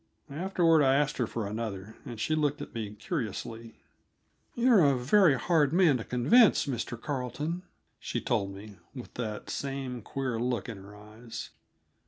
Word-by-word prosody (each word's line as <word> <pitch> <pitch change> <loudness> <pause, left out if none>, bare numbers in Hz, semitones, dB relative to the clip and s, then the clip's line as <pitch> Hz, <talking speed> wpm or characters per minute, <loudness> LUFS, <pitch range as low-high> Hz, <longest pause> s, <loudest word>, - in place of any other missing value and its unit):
Afterward 170 -1 +3
I 135 -1 +4
asked 145 +1 +1
her 125 - 0
for 115 -1 -3
another, 105 -1 -5
and 115 - -7
she 155 - 0
looked 150 -1 +1
at - - -8
me 105 -2 -5
curiously. 115 - -5 0.8
"You're 235 -6 +5
a 140 -3 +4
very 150 +3 +4
hard 155 +1 +2
man 170 -7 +5
to 115 - -5
convince, 155 - +4
Mr. 120 -3 -4
Carleton," 145 +6 -3 0.4
she - - -3
told 100 0 -1
me, 100 +1 -11 0.2
with 125 - -9
that 110 -3 -5
same 135 -3 -4
queer 130 0 -3
look 120 -3 -1
in 115 -4 -6
her 100 +2 -12
eyes. 110 +3 -9
125 Hz, 160 wpm, -29 LUFS, 110-150 Hz, 0.8 s, You're